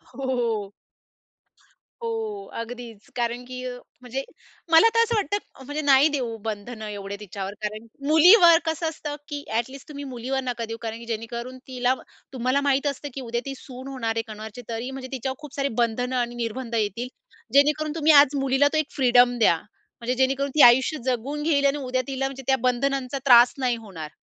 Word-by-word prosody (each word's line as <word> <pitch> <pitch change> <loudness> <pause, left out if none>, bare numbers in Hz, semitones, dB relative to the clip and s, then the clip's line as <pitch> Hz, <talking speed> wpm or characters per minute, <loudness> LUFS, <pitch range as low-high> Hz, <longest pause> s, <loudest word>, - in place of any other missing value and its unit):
हो. 235 -6 -1 1.3
हो, 445 -3 -3 0.2
अगदीच. 230 -2 -9
कारण 240 0 -2
की 255 0 -7 0.4
म्हणजे 260 +2 -4 0.5
मला 325 +8 +8
तर - - +4
असं 465 0 -1
वाटतं, 410 -8 -3
म्हणजे 295 +2 -3
नाही 280 +1 +6
देऊ 250 -6 -2
बंधन 220 +2 -5
एवढे 200 -1 -5
तिच्यावर, 200 -1 -6
कारण 215 +1 -4 0.2
मुलीवर 340 +2 +8
कसं 320 +1 -1
असतं, 295 -2 -6
की 290 -2 -5
ॲट 230 +2 0
लिस्ट 275 0 -11
तुम्ही 285 -1 -7
मुलीवर 260 +3 -2
नका 240 -2 -3
देऊ, 225 0 -6
कारण 225 -1 -4
की 235 - -10
जेणेकरून 235 +3 -5
तिला 255 0 +1 0.4
तुम्हाला 255 +2 +1
माहीत 280 0 +1
असतं 285 +1 -3
की 270 - -5
उद्या 235 -1 -3
ती 275 - -4
सून 260 0 -10
होणार 230 -4 -3
आहे 225 - +1
कोणाची 215 +3 -9
तरी 230 +2 -3
म्हणजे 265 -1 -7
तिच्यावर 265 0 -3
खूप 300 -2 -10
सारी 280 0 0
बंधनं 245 +2 0
आणि 240 -1 -1
निर्बंध 235 +1 -4
येतील. 220 +3 -1 0.5
जेणेकरून 300 +2 +3
तुम्ही 315 0 +4
आज 285 0 +1
मुलीला 270 +1 +3
तो - - +2
एक 310 -1 0
फ्रीडम 245 -2 +4
द्या, 215 -6 +5 0.5
म्हणजे 245 +2 -1
जेणेकरून 270 +2 +1
ती 305 - +5
आयुष्य 255 +6 +6
जगून 265 +4 -2
घेईल 285 -3 +2
आणि 280 +1 +3
उद्या 255 -2 -1
तिला 270 0 -2
म्हणजे 270 0 -8
त्या 265 - +4
बंधनांचा 255 +1 0
त्रास 245 -2 +7
नाही 255 -2 +1
होणार. 185 -9 -8
255 Hz, 180 wpm, -24 LUFS, 235-280 Hz, 1.3 s, मला